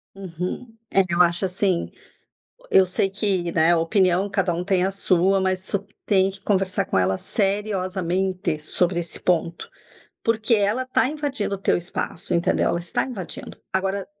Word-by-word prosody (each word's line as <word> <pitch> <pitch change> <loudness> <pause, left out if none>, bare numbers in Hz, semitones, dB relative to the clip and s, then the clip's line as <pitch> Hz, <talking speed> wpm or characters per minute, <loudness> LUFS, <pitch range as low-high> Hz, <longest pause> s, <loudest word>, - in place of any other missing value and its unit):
Uhum. 190 +5 -6 0.2
É, 195 - +6
eu 170 +1 +3
acho 175 +2 +3
assim 185 -1 0 0.7
o - - -21
eu 190 - +6
sei 185 +2 0
que, 195 -3 -1
né, 170 +1 +4
opinião 180 +3 +2
cada 195 -3 0
um 170 +1 -2
tem 185 -1 +1
a 190 - +1
sua, 195 0 +2
mas 185 0 0
su 200 +1 -3 0.2
tem 195 -2 +3
que 195 - -13
conversar 190 -2 0
com - - -1
ela 95 +1 +2
seriamente 190 -4 -1
sobre 175 +3 +1
esse 170 -1 -2
ponto. 170 -1 -1 0.5
Porque 230 +1 +2
ela 210 +4 +1
tá 255 -1 +2
invadindo 280 -9 -2
o - - -14
teu 195 - +2
espaço, 175 0 -3
entendeu? 170 0 +2
Ela 170 - 0
está 170 0 -1
invadindo. 205 -9 -7
Agora, 195 +1 -1
190 Hz, 165 wpm, -23 LUFS, 175-200 Hz, 0.7 s, É